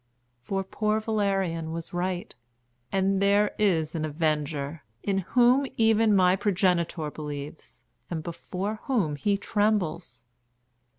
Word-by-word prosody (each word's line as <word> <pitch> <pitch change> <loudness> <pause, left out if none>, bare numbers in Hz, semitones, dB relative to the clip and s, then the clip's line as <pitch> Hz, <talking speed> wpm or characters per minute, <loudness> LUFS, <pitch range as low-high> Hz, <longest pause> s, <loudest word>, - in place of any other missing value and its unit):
For 195 +8 -2
poor 215 +3 0
Valerian 195 -7 -1
was 165 +1 -6
right, 180 0 -2 0.6
and 195 0 +1
there 200 +1 +3
is 165 -7 +2
an 160 - -2
Avenger, 150 -1 -1 0.2
in 195 -1 +1
whom 245 +7 +3
even 225 -1 +4
my 185 -1 +5
progenitor 180 -5 0
believes, 150 0 -8 0.3
and 160 -3 -3
before 190 +5 -4
whom 200 - +1
he 200 +8 +1
trembles. 185 - -1
185 Hz, 115 wpm, -27 LUFS, 160-205 Hz, 0.6 s, my